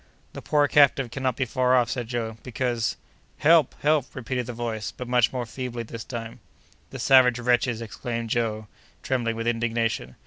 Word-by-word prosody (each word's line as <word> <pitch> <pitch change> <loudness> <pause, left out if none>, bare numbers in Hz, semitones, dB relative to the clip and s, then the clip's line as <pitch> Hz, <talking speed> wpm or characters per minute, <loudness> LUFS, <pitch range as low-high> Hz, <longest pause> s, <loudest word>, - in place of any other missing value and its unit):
"The - - -7
poor 145 -1 +2
captive 135 -4 +4
cannot 130 -3 -1
be 135 - -1
far 130 +1 +2
off," 125 -1 +2
said 120 -3 -3
Joe, 115 -2 -3
"because—" 120 -2 -2 0.4
"Help! 155 -2 +4
help!" 150 -3 +1
repeated 125 -1 -3
the - - -4
voice, 115 -2 -4
but 125 - -8
much 125 -2 +3
more 125 -2 -3
feebly 120 0 -5
this 115 0 -8
time. 115 -2 -7 0.5
"The - - -8
savage 130 -2 +5
wretches!" 120 -1 +1
exclaimed 115 0 -5
Joe, 110 -2 -1 0.4
trembling 120 -3 -1
with 115 0 -4
indignation. 115 - -1
120 Hz, 170 wpm, -25 LUFS, 115-130 Hz, 0.5 s, savage